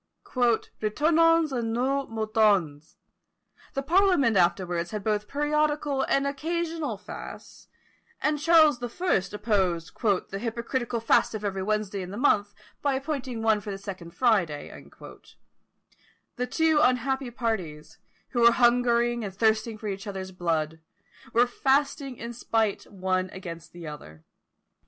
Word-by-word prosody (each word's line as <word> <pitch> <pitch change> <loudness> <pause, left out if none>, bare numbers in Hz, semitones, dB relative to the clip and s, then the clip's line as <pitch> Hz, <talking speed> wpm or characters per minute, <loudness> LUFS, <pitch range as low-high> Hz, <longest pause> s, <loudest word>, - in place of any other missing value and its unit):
"Retournons 305 +7 +2
à 245 -3 -1
nos 255 +5 0
moutons!" 210 -9 +1 0.8
The 275 - -1
parliament 345 - +3
afterwards 175 -1 +1
had 210 +1 -5
both 210 0 -1
periodical 295 -1 0
and 275 +1 +1
occasional 320 -2 -2
fasts; 205 - -10 0.5
and 300 0 0
Charles 310 -4 +5
the 245 -1 -4
First 230 - 0
opposed 190 -6 0
"the 195 -3 0
hypocritical 235 +1 -3
fast 230 - +3
of 210 -1 -5
every 195 -1 -2
Wednesday 210 -1 -1
in 180 - -6
the 200 - -7
month, 205 -6 +2 0.3
by 280 -2 +1
appointing 265 -4 -4
one 220 -2 +3
for 205 - -8
the 195 - -4
second 185 -4 -8
Friday;" 195 - +1 1.6
the 250 +1 -2
two 315 +3 +2
unhappy 265 0 +1
parties, 175 -11 -4 0.3
who 240 - -1
were 235 0 +7
hungering 240 -1 +3
and 195 -2 -6
thirsting 220 +1 +1
for 215 - -7
each 200 +1 -5
other's 190 -1 -5
blood, 160 -3 -2 0.5
were 240 +2 +4
fasting 270 +1 0
in 235 +1 -6
spite 225 -3 -1
one 185 -1 -1
against 170 -3 -9
the 175 -1 -10
other! 80 - -10
225 Hz, 135 wpm, -27 LUFS, 195-270 Hz, 1.6 s, were